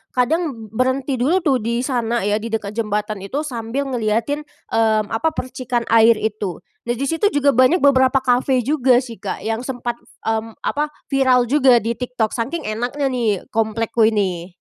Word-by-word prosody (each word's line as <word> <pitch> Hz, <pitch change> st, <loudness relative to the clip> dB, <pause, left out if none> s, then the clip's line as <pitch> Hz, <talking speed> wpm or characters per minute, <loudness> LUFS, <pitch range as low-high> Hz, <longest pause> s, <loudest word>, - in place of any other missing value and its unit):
kadang 250 Hz, -, -1 dB
berhenti 260 Hz, +2 st, 0 dB
dulu 330 Hz, +9 st, +2 dB
tuh 270 Hz, -5 st, +2 dB
di 235 Hz, +2 st, -1 dB
sana 240 Hz, -4 st, -1 dB
ya 205 Hz, +1 st, +1 dB
di 225 Hz, -, -5 dB
dekat 220 Hz, -3 st, -3 dB
jembatan 210 Hz, -1 st, -2 dB
itu 265 Hz, +11 st, -3 dB
sambil 245 Hz, 0 st, -3 dB
ngeliatin, 250 Hz, +3 st, -1 dB, 0.2 s
mmm, 220 Hz, -2 st, +2 dB
apa 225 Hz, +8 st, 0 dB
percikan 250 Hz, -2 st, -3 dB
air 230 Hz, 0 st, +6 dB
itu. 210 Hz, -4 st, -4 dB, 0.2 s
Nah 240 Hz, -, 0 dB
di 265 Hz, -, -4 dB
situ 325 Hz, +8 st, +1 dB
juga 285 Hz, 0 st, +4 dB
banyak 260 Hz, +8 st, +3 dB
beberapa 265 Hz, -1 st, +4 dB
kafe 250 Hz, 0 st, +2 dB
juga 265 Hz, -1 st, +3 dB
sih, 230 Hz, -5 st, -10 dB
Kak, -, -, -5 dB
yang 225 Hz, +1 st, -1 dB
sempat, 245 Hz, -2 st, -4 dB, 0.2 s
mmm, 225 Hz, 0 st, -2 dB
apa 295 Hz, +1 st, 0 dB, 0.2 s
viral 260 Hz, -2 st, +4 dB
juga 270 Hz, -4 st, +5 dB
di 230 Hz, -, -1 dB
TikTok 245 Hz, -2 st, -2 dB
saking 265 Hz, +8 st, -3 dB
enaknya 245 Hz, +6 st, -2 dB
nih 225 Hz, -6 st, 0 dB
komplekku 225 Hz, 0 st, +1 dB
ini. 190 Hz, -6 st, -1 dB
240 Hz, 170 wpm, -20 LUFS, 220-265 Hz, 0.2 s, air